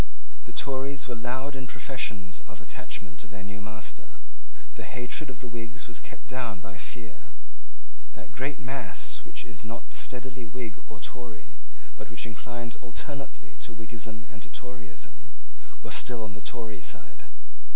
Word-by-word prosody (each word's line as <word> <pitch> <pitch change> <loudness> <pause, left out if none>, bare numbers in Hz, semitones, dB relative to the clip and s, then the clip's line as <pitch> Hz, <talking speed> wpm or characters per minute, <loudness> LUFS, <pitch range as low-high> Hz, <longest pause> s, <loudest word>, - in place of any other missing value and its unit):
The 120 - -4
Tories 135 0 +4
were 125 - +3
loud 125 +4 +3
in 130 -1 0
professions 100 -9 +3
of 105 - -5
attachment 100 -3 -1
to - - -4
their 100 -2 -3
new 100 0 -2
master. 110 +1 -3 0.6
The - - -3
hatred 125 +4 +2
of 125 -2 -3
the 125 - 0
Whigs 115 +1 0
was 115 -2 +1
kept - - -7
down 125 -6 +2
by 100 +2 -4
fear. 115 -1 -4 0.9
That - - -6
great 135 +3 +3
mass 125 -9 +3
which - - -1
is 95 - -5
not 115 +2 -3
steadily 130 0 +2
Whig 115 -1 0 0.2
or 110 - -5
Tory, 120 +1 -3 0.4
but - - -3
which 110 0 +1
inclines 120 +1 -1
alternately 135 +4 -2
to 115 - -1
Whiggism 110 0 -1
and 115 -3 -7
to - - -5
Toryism, 120 - -4 0.6
was - - +3
still 120 -3 +6
on 105 - -2
the 105 - -5
Tory 110 -2 +1
side. 65 -3 -2
115 Hz, 160 wpm, -35 LUFS, 105-125 Hz, 0.9 s, still